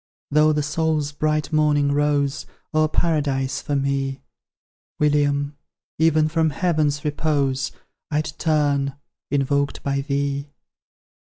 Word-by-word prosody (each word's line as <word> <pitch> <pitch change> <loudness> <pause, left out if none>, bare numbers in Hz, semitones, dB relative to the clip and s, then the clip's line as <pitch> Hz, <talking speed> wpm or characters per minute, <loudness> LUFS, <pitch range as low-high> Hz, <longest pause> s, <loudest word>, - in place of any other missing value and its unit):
Though 150 +1 +5
the 150 -1 0
soul's 150 -1 0
bright 155 +1 -1
morning 150 -2 +3
rose 145 -1 0 0.3
O'er 155 0 +3
Paradise 145 -5 0
for 145 - -2
me, 135 -1 -1 0.8
William! 145 -1 +1 0.4
even 155 -1 +4
from 160 0 +1
Heaven's 150 -2 0
repose 140 -3 0 0.4
I'd 155 +1 -1
turn, 145 -3 +1 0.3
invoked 140 0 0
by 140 0 0
thee! 140 0 -2
145 Hz, 105 wpm, -22 LUFS, 140-155 Hz, 0.8 s, Though